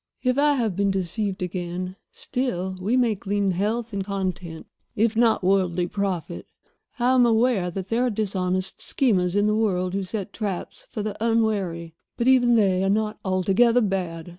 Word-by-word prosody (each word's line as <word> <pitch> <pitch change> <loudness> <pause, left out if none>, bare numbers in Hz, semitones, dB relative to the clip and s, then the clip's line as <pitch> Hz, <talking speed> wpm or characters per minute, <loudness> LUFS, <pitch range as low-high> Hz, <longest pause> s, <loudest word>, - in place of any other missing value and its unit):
If 255 +1 +1
I 295 0 +4
have 225 -8 -1
been 200 +1 +1
deceived 195 +1 -2
again, 180 0 -4 0.2
still 190 -8 -3
we 220 +7 +1
may 240 -3 +3
glean 200 0 -1
health 215 +5 -2
and 195 -1 -2
content, 185 -4 -4 0.3
if 220 +1 +1
not 225 -3 +3
worldly 180 -2 +2
profit. 180 - -3 0.5
I 250 +1 +2
am 255 -1 +5
aware 230 -5 +2
that 190 +2 -6
there 240 +2 +1
are - - +1
dishonest 185 -3 -2
schemers 190 -9 +1
in 205 0 +3
the 210 - +2
world 185 -4 0
who 195 - -1
set 200 +1 -5
traps 200 -5 -5
for 210 - -4
the 210 -1 -3
unwary, 200 -8 0 0.2
but 235 - 0
even 245 -2 +5
they 190 -4 +3
are 195 - +1
not 215 +1 0
altogether 195 +6 +3
bad. 180 -5 -2
200 Hz, 170 wpm, -24 LUFS, 185-225 Hz, 0.5 s, am